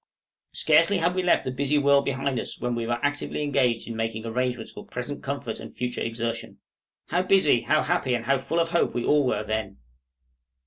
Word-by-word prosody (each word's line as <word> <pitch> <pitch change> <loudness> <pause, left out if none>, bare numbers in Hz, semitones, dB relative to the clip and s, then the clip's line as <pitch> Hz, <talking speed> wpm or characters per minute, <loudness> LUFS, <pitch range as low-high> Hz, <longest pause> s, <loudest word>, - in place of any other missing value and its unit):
Scarcely 165 +6 +4
had 175 +1 +1
we 185 - 0
left 180 - +2
the 130 - -2
busy 140 +3 0
world 140 -1 +4
behind 135 -1 -1
us - - -5
when 125 0 -1
we 115 -1 -2
were 120 0 0
actively 145 +1 -1
engaged 130 -5 +1
in 115 - -5
making 115 0 -3
arrangements 125 0 -2
for - - -10
present - - -6
comfort - - -4
and - - -9
future 125 0 -3
exertion. 115 -2 -3 0.5
How 175 +2 +2
busy, 185 -10 +4
how 155 0 +2
happy, 140 -8 +1
and 115 -1 -4
how 135 0 +2
full 165 +5 -1
of 165 0 +1
hope 170 - +1
we 120 - -1
all 150 -1 +4
were 105 -3 0
then! 110 -2 -3
130 Hz, 205 wpm, -25 LUFS, 115-150 Hz, 0.5 s, Scarcely